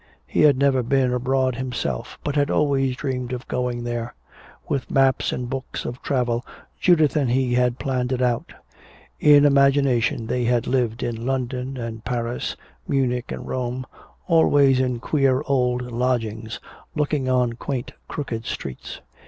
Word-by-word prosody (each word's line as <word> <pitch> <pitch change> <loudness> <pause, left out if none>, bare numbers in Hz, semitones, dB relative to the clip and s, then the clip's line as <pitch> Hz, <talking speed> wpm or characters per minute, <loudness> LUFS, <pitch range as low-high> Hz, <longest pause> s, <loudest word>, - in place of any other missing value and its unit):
He 65 - 0
had 145 -3 +6
never 135 -1 +3
been 125 +1 +1
abroad 130 0 +1
himself 125 - -3
but 145 - -2
had 145 -1 +2
always 135 -3 +1
dreamed 125 -2 -3
of 125 +1 -6
going 125 -1 -2
there. 120 0 -4 0.5
With 140 -3 -2
maps 135 -1 +2
and 125 - -3
books 135 +1 -5
of 120 +1 -5
travel 120 -3 0 0.4
Judith 160 -6 +4
and 140 -5 +2
he 125 0 +1
had 125 0 +2
planned 130 -2 -1
it 130 - 0
out. 125 -2 0 0.7
In 145 -1 +7
imagination 140 -5 +3
they 120 +2 -1
had 120 -1 +2
lived 125 -3 0
in 115 -2 -3
London 130 0 -2
and 115 -2 -6
Paris, 120 0 -2 0.3
Munich 125 -3 0
and - - -6
Rome, 125 0 -3 0.4
always 145 -6 +4
in 125 -2 0
queer 135 0 +1
old 125 -2 +1
lodgings 115 -2 -2 0.4
looking 145 -3 0
on 125 -2 +2
quaint 125 +1 -4 0.2
crooked 120 -7 -4
streets. 65 - -6
125 Hz, 150 wpm, -23 LUFS, 120-135 Hz, 0.7 s, In